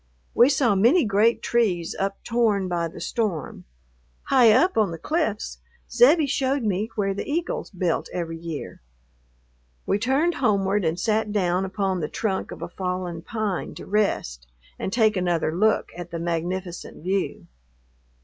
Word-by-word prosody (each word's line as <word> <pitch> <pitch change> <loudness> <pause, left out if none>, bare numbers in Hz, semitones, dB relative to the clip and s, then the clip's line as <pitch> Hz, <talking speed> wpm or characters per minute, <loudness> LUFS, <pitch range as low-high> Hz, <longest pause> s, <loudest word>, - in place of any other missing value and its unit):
We 240 +3 +6
saw 270 -6 +3
many 235 - +4
great 215 +3 +2
trees 190 -8 0
uptorn 200 0 0
by 170 -2 -1
the 165 - -10
storm. 205 - -3 0.6
High 250 -5 +5
up 325 +12 +4
on 215 -3 +3
the 165 - -6
cliffs 215 - -2 0.3
Zebbie 300 +5 +5
showed 270 -1 0
me 210 +1 -1
where 195 -3 0
the 195 - -5
eagles 335 +3 -2
built 180 -3 -1
every 165 -2 -4
year.... 165 -3 -7 1.0
We 200 - +1
turned 270 +9 +2
homeward 200 - +1
and 160 +2 0
sat 215 +1 0
down 185 -2 +1
upon 190 -1 -1
the 150 - -3
trunk 195 -4 -2
of - - -8
a - - -5
fallen 180 -2 -4
pine 210 -1 -3
to - - -9
rest 65 - -1 0.3
and - - -3
take 220 -1 +3
another 170 -3 0
look 215 +4 +2
at 175 -1 -7
the 170 - -5
magnificent 175 +1 -4
view. 190 +2 -2
195 Hz, 150 wpm, -24 LUFS, 175-230 Hz, 1.0 s, We